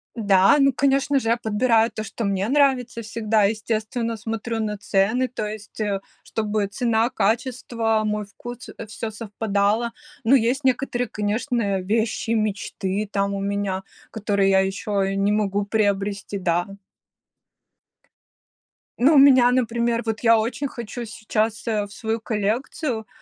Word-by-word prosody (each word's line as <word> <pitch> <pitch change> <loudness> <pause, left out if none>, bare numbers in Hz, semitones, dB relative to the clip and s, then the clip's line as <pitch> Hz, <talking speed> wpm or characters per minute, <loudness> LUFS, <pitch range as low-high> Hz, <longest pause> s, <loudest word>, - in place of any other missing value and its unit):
Да, 200 0 +4
ну 275 -2 +4
конечно 275 +1 +2
же, 225 -3 -2
я 235 - +3
подбираю 225 +1 +2
то, 215 - -5
что 220 +1 -5
мне 195 0 0
нравится 265 -5 +2
всегда. 220 -1 0
Естественно, 220 +2 -1
смотрю 225 +1 -4
на 210 -1 -2
цены, 205 +6 +1
то 240 -3 -4
есть, 210 0 -8
э, 205 -2 0 0.2
чтобы 210 -2 -1
цена, 225 +2 +1
качество, 225 0 0
мой 210 0 -1
вкус, 240 +4 -10
э, 230 - -7
всё 220 +1 -5
совпадало. 215 +1 -1 0.3
Но 250 +5 +5
есть 255 +4 +1
некоторые, 250 -1 0
конечно, 210 -1 -1
вещи 225 +3 -1
мечты 210 -2 -1
там 200 0 0
у 200 - -2
меня, 200 -1 -2 0.3
которые 200 -2 +1
я 190 - +5
еще 195 0 -1
не 195 +1 +1
могу 205 -1 +1
приобрести, 200 -1 -1
да. 175 -1 +1 2.4
Ну, 295 +5 +6
у - - +7
меня, 260 -3 +7
например, 235 -1 0
вот 225 -1 -2
я 230 -1 +5
очень 235 +6 -1
хочу 235 -1 -6
сейчас, 220 0 -2
э, 210 -2 0
в 200 - -14
свою 225 0 -2
коллекцию, 220 +3 -2
220 Hz, 140 wpm, -23 LUFS, 205-235 Hz, 2.4 s, у